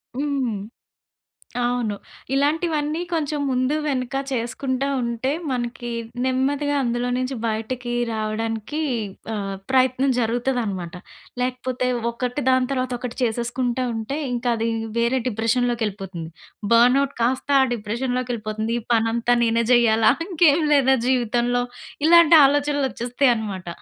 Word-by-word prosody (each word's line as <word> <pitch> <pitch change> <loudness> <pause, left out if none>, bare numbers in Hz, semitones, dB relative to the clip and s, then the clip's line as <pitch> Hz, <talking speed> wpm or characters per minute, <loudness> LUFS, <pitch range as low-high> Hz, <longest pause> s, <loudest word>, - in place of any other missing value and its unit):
హ్మ్. 270 -6 -1 1.1
అవును. 240 -4 0 0.4
ఇలాంటివన్నీ 305 +2 0
కొంచెం 300 -2 -1
ముందు, 255 +3 +1
వెనక 255 -2 -2 0.2
చేసుకుంటా 260 +2 -2 0.2
ఉంటే, 235 +3 -1 0.2
మనకి 240 -1 -3 0.3
నెమ్మదిగా 280 +3 0
అందులో 240 0 -1
నించి 255 +1 -2
బయటకి 235 +2 -3 0.2
రావడానికి, 225 +6 -3 0.5
ఆహ్, 195 -1 -3 0.2
ప్రయత్నం 260 +1 +3
జరుగుతదనమాట. 225 -7 -1 0.5
లేకపోతే 255 0 -2 0.2
ఒకటి 250 +4 -3
దాని 255 0 +3
తర్వాత 255 -1 -1
ఒకటి 250 -1 -6
చేసేసుకుంటా 240 +2 -1
ఉంటే, 225 +5 -3 0.2
ఇంకది 235 -2 0 0.3
వేరే 235 +3 +2
డిప్రెషన్‌లోకెళిపోతుంది. 220 -6 -1 0.4
బర్నౌట్‌ 255 +4 +4
కాస్తా 260 +4 +1
ఆ 260 - +2
డిప్రెషన్‌లోకెళిపోతుంది. 230 -1 -3
ఈ - - -15
పనంతా 230 +2 +2
నేనే 230 0 +2
జేయాలా? 225 -2 +5 0.2
ఇంకేం 330 -4 +4
లేదా 265 -1 +4
జీవితంలో? 245 0 +1 0.4
ఇలాంటి 340 -1 +7
ఆలోచనలొచ్చెస్తయి 275 -3 +1
అనమాట. 195 -5 -5
245 Hz, 105 wpm, -22 LUFS, 230-265 Hz, 1.1 s, ఇలాంటి